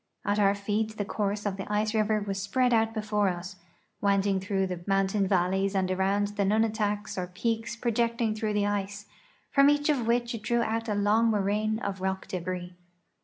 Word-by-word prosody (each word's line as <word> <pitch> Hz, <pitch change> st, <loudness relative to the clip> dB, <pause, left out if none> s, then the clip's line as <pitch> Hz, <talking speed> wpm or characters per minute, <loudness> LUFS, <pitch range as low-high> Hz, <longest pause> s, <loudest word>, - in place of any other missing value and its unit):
At 205 Hz, +1 st, +1 dB
our 200 Hz, -1 st, +4 dB
feet 215 Hz, +2 st, -2 dB
the 205 Hz, -, -2 dB
course 205 Hz, 0 st, -2 dB
of 200 Hz, -2 st, -1 dB
the 195 Hz, +1 st, -6 dB
ice 215 Hz, +1 st, +1 dB
river 215 Hz, -1 st, +1 dB
was 195 Hz, -1 st, -3 dB
si)read 250 Hz, +3 st, +2 dB
out 225 Hz, -1 st, +3 dB
before 210 Hz, -2 st, 0 dB
us. 180 Hz, +1 st, -6 dB, 0.4 s
winding 200 Hz, -1 st, +2 dB
through 195 Hz, 0 st, -1 dB
the 180 Hz, -2 st, -4 dB
mountain 195 Hz, 0 st, +1 dB
valleys 190 Hz, +1 st, +1 dB
and 185 Hz, -1 st, +1 dB
around 195 Hz, +2 st, +1 dB
the 205 Hz, -1 st, -1 dB
nunataks 210 Hz, -1 st, 0 dB
or 180 Hz, -, -3 dB
peaks 225 Hz, +5 st, -2 dB
projecting 235 Hz, -1 st, 0 dB
through 215 Hz, 0 st, -2 dB
the 205 Hz, -1 st, +1 dB
ice, 205 Hz, 0 st, -2 dB, 0.5 s
from 275 Hz, 0 st, +6 dB
each 290 Hz, +1 st, +2 dB
of 255 Hz, -6 st, +1 dB
which 240 Hz, +1 st, +1 dB
it 230 Hz, -, -5 dB
drew 235 Hz, +2 st, +1 dB
out 225 Hz, +1 st, -2 dB
a 210 Hz, -, 0 dB
long 210 Hz, +3 st, +3 dB
moraine 210 Hz, +1 st, +1 dB
of 200 Hz, -4 st, -4 dB
rock 190 Hz, 0 st, -2 dB
debris. 180 Hz, 0 st, -4 dB
205 Hz, 190 wpm, -28 LUFS, 195-220 Hz, 0.5 s, from